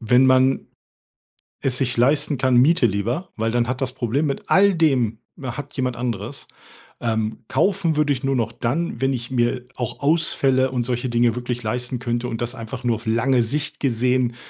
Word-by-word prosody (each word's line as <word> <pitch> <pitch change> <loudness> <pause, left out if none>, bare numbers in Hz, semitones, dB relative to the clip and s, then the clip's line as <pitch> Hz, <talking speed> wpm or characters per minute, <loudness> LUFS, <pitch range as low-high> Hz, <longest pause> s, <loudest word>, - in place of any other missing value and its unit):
wenn 125 +3 +4
man 130 +1 +3 1.0
es 130 -2 +1
sich 130 -2 0
leisten 145 +3 +2
kann, 130 -1 +2
miete 145 +3 +5
lieber, 115 - -1
weil 110 +1 0
dann 120 -1 +1
hat 125 +1 -3
das 130 -1 -1
Problem 130 +6 -1
mit 140 - -3
all 200 0 +5
dem 130 -9 +2 0.2
hat 135 +2 -6
jemand 125 -2 -2
anderes. 120 +1 -4 0.5
Ähm, 110 -1 -2
kaufen 170 +3 +1
würde 150 -1 +3
ich 130 - -6
nur 135 -1 +1
noch 115 0 -1
dann, 135 +2 -2
wenn 135 - +2
ich 120 -2 -4
mir 125 0 0
auch 125 -3 -4
Ausfälle 140 -4 +2
und 125 -2 -1
solche 120 +1 -2
Dinge 120 0 +2
wirklich 120 0 -3
leisten 125 +3 -3
könnte 120 0 -2
und 115 - -4
das 120 +1 -2
einfach 125 +2 -7
nur 120 -2 +2
auf 115 - -9
lange 120 +2 +2
Sicht 145 +5 -3
gesehen 125 -1 +1
125 Hz, 185 wpm, -22 LUFS, 120-135 Hz, 1.0 s, miete